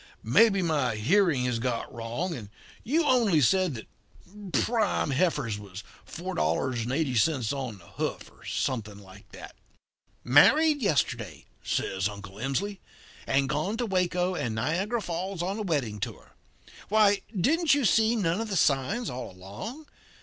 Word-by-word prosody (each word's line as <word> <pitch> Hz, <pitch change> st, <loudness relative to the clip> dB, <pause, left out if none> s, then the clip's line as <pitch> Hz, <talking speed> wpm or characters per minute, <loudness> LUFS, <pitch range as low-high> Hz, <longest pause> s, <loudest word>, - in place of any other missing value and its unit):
'Maybe 195 Hz, -, +4 dB
my 145 Hz, -9 st, 0 dB
hearing 145 Hz, -, +2 dB
has 125 Hz, -2 st, -1 dB
got 120 Hz, -1 st, -3 dB
wrong, 120 Hz, +10 st, -3 dB
and 110 Hz, -9 st, -8 dB, 0.3 s
you 315 Hz, +7 st, +1 dB
only 235 Hz, -, +4 dB
said 180 Hz, +3 st, +2 dB
that 110 Hz, -, -8 dB, 0.6 s
prime 215 Hz, -, +1 dB
heifers 135 Hz, -, 0 dB
was 100 Hz, -1 st, -9 dB, 0.3 s
4.80 125 Hz, -, 0 dB
on 130 Hz, -6 st, -4 dB
the 85 Hz, -, -18 dB
hoof, -, -, -5 dB
or -, -, -21 dB
something 110 Hz, -5 st, -3 dB
like 100 Hz, 0 st, -15 dB
that.' -, -, -11 dB, 0.7 s
"'Married 290 Hz, -, +5 dB
yesterday,' 130 Hz, -, -1 dB, 0.2 s
says 95 Hz, +1 st, -1 dB
Uncle 100 Hz, -1 st, -10 dB
Emsley, 190 Hz, -, -2 dB, 0.5 s
'and 135 Hz, 0 st, +2 dB
gone 155 Hz, +11 st, -1 dB
to 245 Hz, -, -1 dB
Waco 180 Hz, -2 st, 0 dB
and 120 Hz, -10 st, -2 dB
Niagara 185 Hz, -, -1 dB
Falls 180 Hz, +1 st, -3 dB
on 195 Hz, +4 st, -2 dB
a -, -, -2 dB
wedding 140 Hz, -, -1 dB
tour. -, -, -6 dB, 0.6 s
Why, 205 Hz, -1 st, +4 dB, 0.2 s
didn't 305 Hz, -, +3 dB
you 285 Hz, -3 st, +1 dB
see 220 Hz, +2 st, +4 dB
none 190 Hz, -2 st, 0 dB
of 225 Hz, -, -4 dB
the 195 Hz, -, -2 dB
signs 155 Hz, -, +1 dB
all 125 Hz, 0 st, -5 dB
along? 100 Hz, -, -9 dB
150 Hz, 140 wpm, -27 LUFS, -, 0.7 s, Married